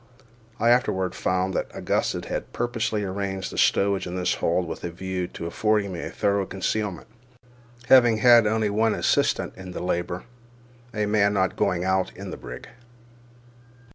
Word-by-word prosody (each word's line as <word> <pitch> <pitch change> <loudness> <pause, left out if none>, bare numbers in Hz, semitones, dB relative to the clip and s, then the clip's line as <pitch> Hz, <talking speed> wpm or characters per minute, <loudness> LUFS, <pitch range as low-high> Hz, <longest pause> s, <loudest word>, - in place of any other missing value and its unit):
I 115 +2 +4
afterward 95 -7 +1
found 95 +1 -1
that - - -2
Augustus - - -1
had - - -4
purposely 115 -3 -1
arranged 95 -1 -3
the - - -8
stowage 100 -1 +2
in 90 - -5
this 90 -1 0
hold 85 +1 0
with 80 - -7
a 85 - -2
view 90 +1 -4
to 85 - -8
affording 100 +3 0
me 85 - -5
a - - -5
thorough 100 -1 0
concealment, 95 0 -2 0.8
having 120 -4 +6
had 120 -1 +6
only 110 -1 +1
one 110 +1 +2
assistant - - +1
in 90 -1 -9
the - - -5
labour, 90 0 -2 0.7
a 105 -2 -1
man 105 -1 +2
not 95 -1 +1
going 90 -1 0
out 95 0 +1
in 100 0 -7
the - - -6
brig. - - -9
100 Hz, 165 wpm, -25 LUFS, 90-110 Hz, 0.8 s, having